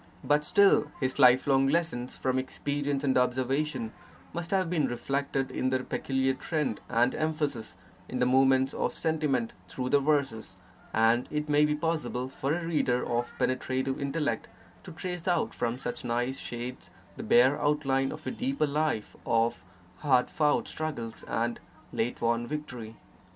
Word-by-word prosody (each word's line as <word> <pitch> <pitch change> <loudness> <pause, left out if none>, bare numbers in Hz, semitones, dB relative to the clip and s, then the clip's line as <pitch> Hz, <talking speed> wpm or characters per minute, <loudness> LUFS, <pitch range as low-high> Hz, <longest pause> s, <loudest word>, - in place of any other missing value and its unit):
But 150 0 +3
still 200 +6 +4
his 130 0 -1
life 130 -1 +7
long 135 -1 +4
lessons 145 -5 -1
from 130 0 0
experience 140 +1 -2
and 135 -2 +2
observation 130 0 0 0.4
must 170 0 -4
have 190 -2 +2
been 165 -3 +1
reflected 135 +2 -2
in 130 - 0
their 130 0 0
peculiar 135 0 0
trend 150 -4 -2
and 120 +1 +3
emphasis 150 - -2 0.3
in 130 - -3
the 125 - +2
movements 130 +1 +4
of - - -1
sentiment 150 -7 0
through 125 +7 -4
the 145 - +5
verses; 135 -9 0 0.3
and 115 +2 +3
it 150 0 -2
may 150 0 +4
be 150 0 +1
possible 150 -6 -2
for 135 +1 -3
a 170 +2 -1
reader 140 -7 +1
of 120 0 -1
penetrative 130 +1 -1
intellect 140 -4 -1 0.4
to - - -8
trace 180 +1 -5
out 175 -3 +1
from 120 0 -1
such - - -5
nice 120 +2 -1
shades 120 +1 -6 0.3
the - - -7
bare 130 +5 +4
outline 135 -2 +1
of - - -9
a - - -2
deeper 255 - 0
life 150 -6 -1
of 115 -1 +1 0.3
hard 130 -4 +2
fought 150 -2 +2
struggles 140 -8 -5
and 115 +1 -1 0.3
late 115 +2 -1
won 120 0 +1
victory. 125 -7 -6
135 Hz, 155 wpm, -29 LUFS, 125-150 Hz, 0.4 s, life